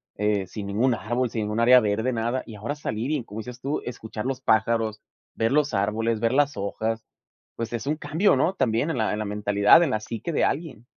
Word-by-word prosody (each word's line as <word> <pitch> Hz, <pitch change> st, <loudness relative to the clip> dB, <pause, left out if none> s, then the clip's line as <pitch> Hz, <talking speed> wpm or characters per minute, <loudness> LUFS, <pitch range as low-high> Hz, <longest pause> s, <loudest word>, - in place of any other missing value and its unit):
eh, 105 Hz, -1 st, 0 dB
sin 100 Hz, +2 st, -7 dB
ningún 115 Hz, +6 st, +2 dB
árbol, 120 Hz, +3 st, -1 dB
sin 110 Hz, -2 st, -2 dB
ningún 105 Hz, +2 st, -1 dB
área 125 Hz, +2 st, +7 dB
verde, 110 Hz, +3 st, 0 dB
nada 120 Hz, +2 st, -1 dB
y 110 Hz, -, -10 dB
ahora 120 Hz, +8 st, -4 dB
salir 125 Hz, -2 st, -3 dB
y, 145 Hz, -5 st, -1 dB
como 110 Hz, 0 st, -8 dB
dices 125 Hz, +2 st, -8 dB
tú, 140 Hz, +3 st, -2 dB
escuchar 110 Hz, -2 st, -6 dB
los 135 Hz, 0 st, -2 dB
pájaros, 110 Hz, -1 st, +1 dB, 0.3 s
ver 115 Hz, +4 st, +1 dB
los 150 Hz, -3 st, +2 dB
árboles, 110 Hz, +3 st, 0 dB
ver 115 Hz, +2 st, +1 dB
las 145 Hz, -2 st, +2 dB
hojas, 110 Hz, +3 st, -3 dB, 0.5 s
pues 115 Hz, 0 st, -4 dB
es 120 Hz, +3 st, -4 dB
un 150 Hz, -, +1 dB
cambio, 155 Hz, +6 st, +2 dB
¿no? 170 Hz, +8 st, +1 dB
También 125 Hz, +2 st, +1 dB
en 160 Hz, -, -2 dB
la 110 Hz, -2 st, 0 dB
en 105 Hz, -, -3 dB
la 110 Hz, -, -2 dB
mentalidad, 105 Hz, +8 st, +4 dB
en 150 Hz, -, 0 dB
la 110 Hz, -, -1 dB
psique 115 Hz, +8 st, -5 dB
de -, -, +2 dB
alguien. 145 Hz, -7 st, -2 dB
115 Hz, 225 wpm, -25 LUFS, 110-130 Hz, 0.5 s, área